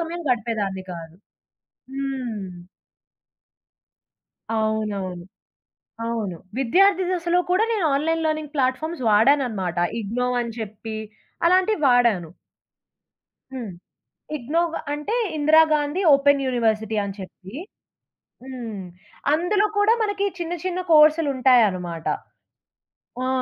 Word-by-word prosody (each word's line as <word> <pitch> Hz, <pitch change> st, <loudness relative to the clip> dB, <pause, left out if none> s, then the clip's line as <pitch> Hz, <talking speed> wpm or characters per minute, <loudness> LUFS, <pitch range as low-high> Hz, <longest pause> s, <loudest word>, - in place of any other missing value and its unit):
సమయం 335 Hz, +1 st, -4 dB
గడిపేదాన్ని 215 Hz, -6 st, -2 dB
కాదు. 165 Hz, -1 st, -9 dB, 0.8 s
హ్మ్. 255 Hz, -8 st, -4 dB, 2.1 s
అవునవును. 210 Hz, -5 st, -2 dB, 0.8 s
అవును. 220 Hz, -6 st, -3 dB, 0.2 s
విద్యార్థి 375 Hz, +9 st, +3 dB
దశలో 350 Hz, -1 st, +1 dB
కూడా 375 Hz, +5 st, +3 dB
నేను 405 Hz, -7 st, +1 dB
ఆన్‌లైన్ 325 Hz, +3 st, 0 dB
లెర్నింగ్ 310 Hz, -1 st, -2 dB
ప్లాట్‌ఫామ్స్ 275 Hz, +3 st, -1 dB
వాడాననమాట. 215 Hz, -, +2 dB, 0.2 s
'ఇగ్నో' 240 Hz, +4 st, -2 dB
అని 235 Hz, -1 st, -4 dB
చెప్పి 220 Hz, 0 st, -6 dB, 0.5 s
అలాంటివి 370 Hz, +1 st, +3 dB
వాడాను. 235 Hz, -9 st, +3 dB, 1.2 s
హ్మ్. 235 Hz, -7 st, -6 dB, 0.6 s
ఇగ్నోవ్ 325 Hz, +6 st, -1 dB, 0.2 s
అంటే 295 Hz, +9 st, -3 dB, 0.2 s
ఇందిరాగాంధీ 310 Hz, +2 st, +3 dB
ఓపెన్ 280 Hz, 0 st, +3 dB
యూనివర్సిటీ 220 Hz, -3 st, 0 dB
అని 200 Hz, -1 st, -6 dB
చెప్పి. 190 Hz, +2 st, -11 dB, 0.9 s
హ్మ్. 235 Hz, -6 st, -6 dB, 0.5 s
అందులో 400 Hz, +6 st, +2 dB
కూడా 415 Hz, +2 st, +5 dB
మనకి 410 Hz, -1 st, 0 dB
చిన్న 345 Hz, 0 st, -3 dB
చిన్న 370 Hz, 0 st, -2 dB
కోర్సులుంటాయనమాట. 255 Hz, -, +4 dB, 1.2 s
ఆ! -, -, 0 dB
260 Hz, 90 wpm, -23 LUFS, 215-325 Hz, 2.1 s, కూడా